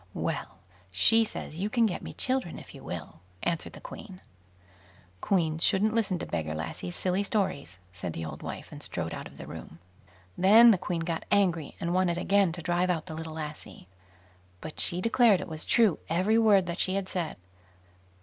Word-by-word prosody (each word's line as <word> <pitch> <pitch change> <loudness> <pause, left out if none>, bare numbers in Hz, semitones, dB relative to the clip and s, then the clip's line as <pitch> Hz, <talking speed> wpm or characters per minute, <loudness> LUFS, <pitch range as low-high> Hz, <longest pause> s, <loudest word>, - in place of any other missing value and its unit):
"Well, - - -3 0.3
she 225 - +5
says 165 -7 -6
you 200 +3 -1
can 235 0 +3
get 200 - -2
me - - -7
children 255 -10 -2
if - - -12
you - - -12
will", - - -7 0.2
answered 170 -2 -2
the - - -10
Queen. 190 -4 -10 1.0
"Queens 165 -4 +1
shouldn't 215 +3 +4
listen 205 -5 +1
to - - -5
beggar 80 -2 -3
lassies' 85 +2 -5
silly 185 +1 0
stories", 195 - -2 0.2
said 85 -2 -5
the 80 - -5
old 75 -2 -7
wife, - - -7
and - - -9
strode - - -3
out - - -6
of - - -16
the - - -8
room. 80 - -9 0.6
Then 220 - +8
the 190 - +2
Queen 175 -2 -2
got 165 0 -3
angry, 175 -7 +1
and 170 +1 -2
wanted 180 -2 +2
again 195 0 +3
to 170 -1 -8
drive 175 +2 +1
out 165 -3 0
the 170 - -7
little 160 0 -6
lassie; 150 - -8 0.7
but 155 - -8
she 175 +1 +2
declared 230 -2 +4
it 185 - -6
was 160 -2 -3
true 225 -7 +3
every 190 +7 +2
word 205 -4 +5
that 170 +1 -4
she 185 - +2
had 195 -1 -2
said. 175 -4 -3
180 Hz, 190 wpm, -28 LUFS, 160-200 Hz, 1.0 s, Then